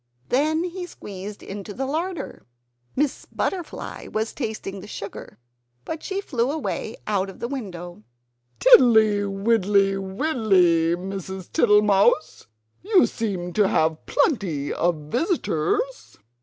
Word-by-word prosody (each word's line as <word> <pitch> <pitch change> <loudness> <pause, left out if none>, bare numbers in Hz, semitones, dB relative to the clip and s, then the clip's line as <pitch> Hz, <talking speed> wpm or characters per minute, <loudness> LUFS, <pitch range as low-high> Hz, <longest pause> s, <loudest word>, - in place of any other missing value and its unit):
Then 310 +5 +2
he 360 0 -5
squeezed 205 - -9
into 200 0 -7
the 270 - -2
larder. 320 - -4 0.5
Miss 290 0 -1
Butterfly 360 -4 -4
was 220 +1 -2
tasting 205 -3 -5
the 195 - -10
sugar; 200 - -8 0.5
but 320 - -5
she 390 0 -3
flew 245 -9 -1
away 285 -6 -3
out 200 -2 0
of 195 - -11
the 235 - -3
window. 180 - -6 0.6
"Tiddly, 225 - +6
widdly, 195 -1 +2
widdly, 190 - +2
Mrs. 190 0 -6
Tittlemouse; 210 - +3 0.3
you 390 -1 +4
seem 185 -6 -3
to 210 0 +3
have 160 -2 0
plenty 190 - 0
of 175 +1 +1 0.2
visitors!" 415 - -1
210 Hz, 115 wpm, -24 LUFS, 190-295 Hz, 0.6 s, Tiddly